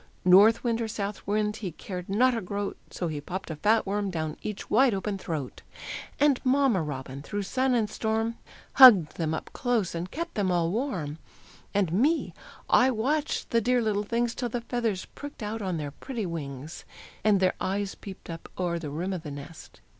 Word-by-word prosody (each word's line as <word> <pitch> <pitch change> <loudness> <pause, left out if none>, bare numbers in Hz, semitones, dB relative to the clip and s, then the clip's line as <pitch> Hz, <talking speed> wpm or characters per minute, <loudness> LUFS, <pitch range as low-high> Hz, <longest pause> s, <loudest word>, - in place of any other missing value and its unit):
North 200 +5 +7
wind 235 -1 0
or 225 - -1
south 205 -1 -4
wind, 210 +1 0
he 185 -7 -5
cared 180 +1 -7
not 245 +5 +3
a 225 - -2
groat, 200 +2 -3
So 175 - -3
he 150 -2 -4
popped 185 +3 -5
a - - -4
fat 215 +8 +2
worm 200 0 -1
down 155 -4 -3
each 210 -2 -5
wide 250 -1 +4
open 195 0 -3
throat; 155 -8 -5 0.6
And 285 -3 +3
Mamma 260 -7 +3
Robin 135 -2 -5
through 205 +7 -3
sun 255 +5 +1
and 225 -3 +2
storm 220 +2 -1 0.4
Hugged 195 - +9
them 160 -2 0
up - - -7
close, 240 -7 0
and 170 +2 -4
kept 335 - -5
them 195 -3 0
all 170 -1 +1
warm; 180 - -2 0.5
And 195 -5 +1
me, 290 - +2 0.3
I 255 - +5
watched 285 +6 -1
the 230 - +3
dear 250 +3 +2
little 215 -3 +1
things 235 +2 0
Till 245 -1 -3
the 240 +1 -3
feathers 230 -5 -2
pricked 285 -5 -8
out 215 +2 -3
on 185 -4 -2
their 145 -2 -4
pretty 230 - -5
wings, 150 -3 -6 0.4
And 210 -2 +4
their 185 -1 +3
eyes 200 +1 -1
peeped 195 -2 -10
up 165 -1 -8
o'er 175 -2 -1
the 155 -3 -5
rim 175 +7 -3
of 180 - -4
the 155 - -7
nest. 145 +3 -10
205 Hz, 195 wpm, -27 LUFS, 170-230 Hz, 0.6 s, Hugged